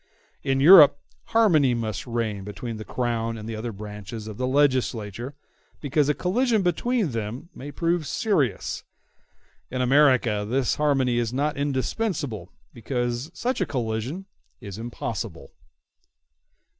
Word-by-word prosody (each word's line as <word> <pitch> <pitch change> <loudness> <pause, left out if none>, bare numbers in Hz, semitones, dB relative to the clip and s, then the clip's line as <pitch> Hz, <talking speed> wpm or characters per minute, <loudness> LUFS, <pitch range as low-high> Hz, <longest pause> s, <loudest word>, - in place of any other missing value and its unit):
In 135 0 0
Europe, 145 -2 +9 0.3
harmony 160 - +4
must 110 -1 -4
reign 115 -4 -2
between 110 +3 -6
the 110 - -6
Crown 115 -1 -2
and 110 0 -8
the 115 - -4
other 115 +2 -4
branches 105 +1 -8
of 105 -2 -7
the 125 - -1
legislature, 130 -3 0 0.4
because 145 0 +1
a 150 - +2
collision 220 +3 +1
between 195 - 0
them 115 +7 -5
may 140 - -8
prove 165 +1 0
serious; 145 - 0 0.9
in 130 - -4
America, 125 -5 +3
this 130 0 +1
harmony 135 -5 +2
is 115 -1 -1
not 145 +4 -1
indispensable, 140 - -2 0.2
because 120 +2 -3
such 255 +2 -1
a - - +2
collision 125 - -3 0.3
is 100 0 -8
impossible. 115 - -5
125 Hz, 130 wpm, -25 LUFS, 115-150 Hz, 0.9 s, Europe